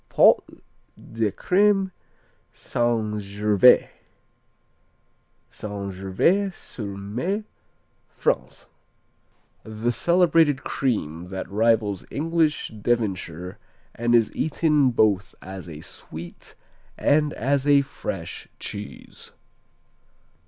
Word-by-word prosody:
Pots - - +4 0.4
de 110 -2 -2
Crème 195 - +2 0.6
St. 115 -3 -1
Gervais 105 +3 +4 1.6
St. 100 -2 -5
Gervais 95 - +1
sur 105 - -7
mer, 125 - -3 0.7
France - - -2 0.9
The 110 +2 -2
celebrated 165 0 +3
cream 90 - -2
that 95 0 -5
rivals 105 -2 +1
English 160 0 0
Devonshire 95 -6 -2 0.3
and 120 +1 +1
is 115 -2 +2
eaten 150 -3 +2
both 105 -5 +1
as 95 -2 -9
a 75 -1 -9
sweet 85 +2 -10 0.4
and 150 0 +2
as 140 +3 0
a 145 -1 +6
fresh 95 -10 -6
cheese. 105 0 -8
115 Hz, 85 wpm, -24 LUFS, 100-145 Hz, 1.6 s, a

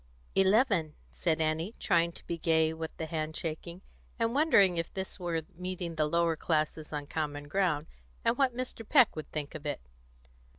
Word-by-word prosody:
"Eleven," 190 - +3 0.2
said 165 -2 0
Annie, 160 +6 0
trying 170 -3 +2
to - - -13
be 170 - -2
gay 160 -1 +2
with 160 0 -4
the 160 - -3
hand 155 0 -3
shaking, 170 +2 -5 0.3
and 230 0 +1
wondering 205 - +5
if 165 - -2
this 190 +1 -5
were 170 -3 -1
meeting 180 -1 -4
the 155 -1 +1
lower 170 0 +2
classes 155 -1 -1
on 145 -1 -3
common 145 -1 -3
ground, 165 -3 +1 0.4
and 230 - +3
what 255 -2 +1
Mr. 255 -3 -4
Peck 255 +1 +5
would 155 - -7
think 150 -2 -4
of 155 - -7
it. 145 - -2
165 Hz, 175 wpm, -31 LUFS, 155-190 Hz, 0.4 s, wondering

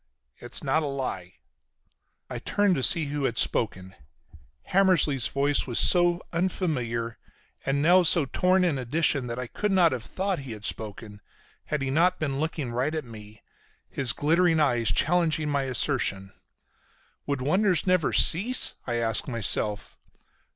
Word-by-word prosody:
It's 120 - -4
not 145 +3 +1
a 150 - -3
lie." 110 -10 -5 0.9
I - - -6
turned 205 -2 +1
to 135 - -1
see 160 +4 +5
who 145 -1 -3
had 120 - -2
spoken. 95 -4 -1 0.8
Hammersly's 170 - +2
voice 140 +3 0
was 120 - -3
so 175 -1 +3
unfamiliar 130 - -2 0.5
and 140 +1 0
now 180 +3 +5
so 170 -3 +3
torn 185 +7 +1
in 160 -7 0
addition 135 0 0
that 120 0 -5
I 125 - -4
could 210 - -3
not 180 -4 +4
have 130 -2 -3
thought 190 -2 -3
he 135 -4 -7
had 105 0 -10
spoken, 105 -1 -6 0.4
had 150 -2 -3
he 135 - -2
not 180 +5 +2
been 140 -4 -3
looking 155 -5 -3
right 130 +6 -2
at 155 -3 -4
me, 105 -2 -13 0.5
his 130 -4 0
glittering 165 +2 +2
eyes 120 -8 +2
challenging 155 - +1
my 140 -1 0
assertion. 120 -7 -2 0.9
Would 140 -3 -2
wonders 185 +5 +1
never 180 -4 +1
cease? 220 +10 +4
I 120 - -2
asked 115 -2 -1
myself. 105 -3 -2
140 Hz, 150 wpm, -26 LUFS, 120-170 Hz, 0.9 s, see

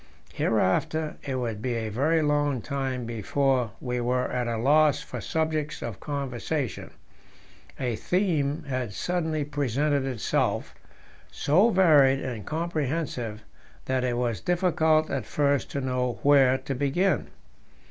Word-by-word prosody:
Hereafter 115 +9 0
it 135 -2 -4
would 115 -4 -3
be 125 0 -1
a 110 -1 -2
very 155 +9 +1
long 145 -2 +1
time 130 -3 -3
before 120 +1 0
we 125 -1 -2
were 125 +1 0
at 125 -1 -1
a 115 -1 -1
loss 145 +4 +4
for - - -7
subjects 155 -1 -2
of 110 -5 -5
conversation; 140 -1 -3 0.9
a 125 -3 -1
theme 160 - 0
had 130 -7 -3
suddenly 160 -4 -1
presented 145 0 0
itself, 130 -4 -1 0.6
so 185 +11 +3
varied 150 -9 +5
and 120 -7 -5
comprehensive 150 -8 -2 0.4
that 130 -1 0
it 125 -1 0
was 120 -3 -1
difficult 160 -3 +2
at - - -3
first 140 -3 +1
to 140 - -3
know 125 -2 -1
where 135 -2 +5
to 135 - -5
begin. 145 +9 +1
140 Hz, 130 wpm, -26 LUFS, 125-155 Hz, 0.9 s, varied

